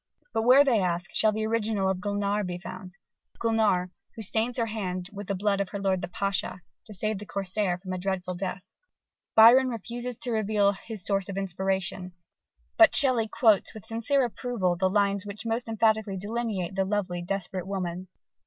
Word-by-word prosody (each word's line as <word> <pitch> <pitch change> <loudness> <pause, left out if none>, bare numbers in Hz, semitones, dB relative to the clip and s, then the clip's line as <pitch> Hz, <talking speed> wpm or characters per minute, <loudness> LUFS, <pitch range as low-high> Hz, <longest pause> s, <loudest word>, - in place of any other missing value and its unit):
_) - - -46
But - - +1
where, 255 +5 +7
they 255 -6 +3
ask, 175 -1 -2
shall 215 - +4
the 215 +1 -2
original 220 -3 0
of 190 -1 0
Gulnare 205 0 -1
be 180 -2 -4
found, 185 +1 -9 0.4
Gulnare, 215 -6 +1 0.2
who 220 - -5
stains 225 +4 -1
her 230 - +1
hand 185 -4 -4
with 205 -1 -7
the 200 - -1
blood 200 +1 +1
of 195 - -3
her 200 - -5
lord 190 -2 0
the - - -3
Pasha, 190 0 -2 0.3
to 215 - -10
save 215 +1 -1
the 210 - -8
Corsair 195 -1 -1
from 185 0 -7
a 185 - -3
dreadful 185 -1 -2
death? 185 +1 -5 0.6
Byron 245 +4 +8
refuses 240 +1 -5
to 245 - -3
reveal 210 -2 +2
his 200 -1 -8
source 195 -1 0
of 195 - -5
inspiration: 190 0 -2 0.6
but 330 -1 +7
Shelley 250 -5 +4
quotes 215 -2 +2
with 215 - -9
sincere 250 +4 +1
approval 230 -6 -1
the 185 +2 +1
lines 200 0 +1
which 205 +2 -8
most 230 +2 -2
emphatically 220 -3 +1
delineate 205 -3 -3
that 190 - +2
lovely, 190 -4 -1
desperate 190 0 -4
woman. 185 -2 -4
200 Hz, 185 wpm, -27 LUFS, 185-220 Hz, 0.6 s, Byron